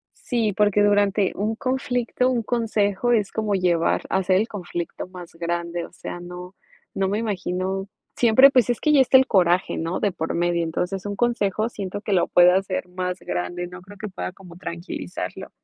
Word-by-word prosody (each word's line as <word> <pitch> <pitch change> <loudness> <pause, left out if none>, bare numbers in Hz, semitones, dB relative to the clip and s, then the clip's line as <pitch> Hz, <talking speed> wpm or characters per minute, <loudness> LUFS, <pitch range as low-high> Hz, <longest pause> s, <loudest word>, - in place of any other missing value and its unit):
Sí, 230 -4 -1
porque 205 +1 +3
durante 205 -1 +3
un 215 +3 -1
conflicto, 250 0 0
un 240 -3 0
consejo, 225 -1 0
es 210 -4 +2
como 215 -2 -1
llevar 175 -3 +1
hacer 190 0 +2
el 215 - +1
conflicto 175 -6 -5
más 180 -2 -11
grande. 170 0 -3
O - - -15
sea, 175 - -7
no, 180 +1 -9 0.4
no 195 0 0
me 205 - 0
imagino. 190 -2 -2 0.3
Siempre, 250 +4 +6
pues, 250 -3 +3
es 240 - 0
que 305 - +2
ya 275 - +7
está 260 0 +6
el 265 - +5
coraje, 180 -3 +2
¿no?, 165 +3 -2
de 205 - +1
por 165 -2 -3
medio. 175 0 +1
Entonces, 180 +4 -3
un 205 - -3
consejo, 215 -2 0
siento 200 -3 -5
que 210 -1 -2
lo 180 - +3
puedo 180 0 +6
hacer 185 -1 -1
más 180 0 -3
grande. 175 - -3
No 180 0 -10
creo 200 +3 -14
que 210 - -5
pueda 190 -1 -5
como 180 -2 -14
tranquilizarlo. 170 - -6
195 Hz, 190 wpm, -23 LUFS, 180-215 Hz, 0.4 s, ya